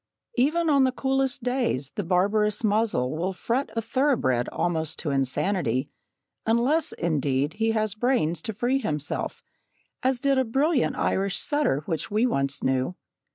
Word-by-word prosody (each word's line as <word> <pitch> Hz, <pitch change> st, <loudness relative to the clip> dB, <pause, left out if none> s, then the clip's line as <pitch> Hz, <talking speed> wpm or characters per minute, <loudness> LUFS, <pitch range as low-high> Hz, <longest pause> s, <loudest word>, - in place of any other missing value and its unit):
Even 310 Hz, +7 st, +2 dB
on 280 Hz, -3 st, +4 dB
the 260 Hz, -, +3 dB
coolest 265 Hz, -1 st, 0 dB
days, 245 Hz, -, -1 dB
the 205 Hz, -, -3 dB
barbarous 205 Hz, +5 st, +1 dB
muzzle 205 Hz, -, +1 dB
will 180 Hz, +4 st, -2 dB
fret 240 Hz, +8 st, -1 dB
a 230 Hz, -, -1 dB
thoroughbred 230 Hz, -, +1 dB
almost 160 Hz, -3 st, -1 dB
to 150 Hz, -, -3 dB
insanity, 135 Hz, -, 0 dB, 0.5 s
unless, 245 Hz, +8 st, +3 dB
indeed, 145 Hz, -4 st, 0 dB
he 225 Hz, +1 st, 0 dB
has 215 Hz, -2 st, 0 dB
brains 215 Hz, -, 0 dB
to 220 Hz, -, -3 dB
free 245 Hz, +6 st, 0 dB
himself, 150 Hz, -, -3 dB, 0.6 s
as 260 Hz, -1 st, +1 dB
did 275 Hz, 0 st, +2 dB
a -, -, +3 dB
brilliant 270 Hz, +4 st, +1 dB
Irish 195 Hz, 0 st, 0 dB
setter 290 Hz, -, 0 dB
which 160 Hz, -2 st, -2 dB
we 215 Hz, +4 st, +2 dB
once 140 Hz, -, -1 dB
knew. 130 Hz, +5 st, 0 dB
215 Hz, 150 wpm, -25 LUFS, 155-260 Hz, 0.6 s, on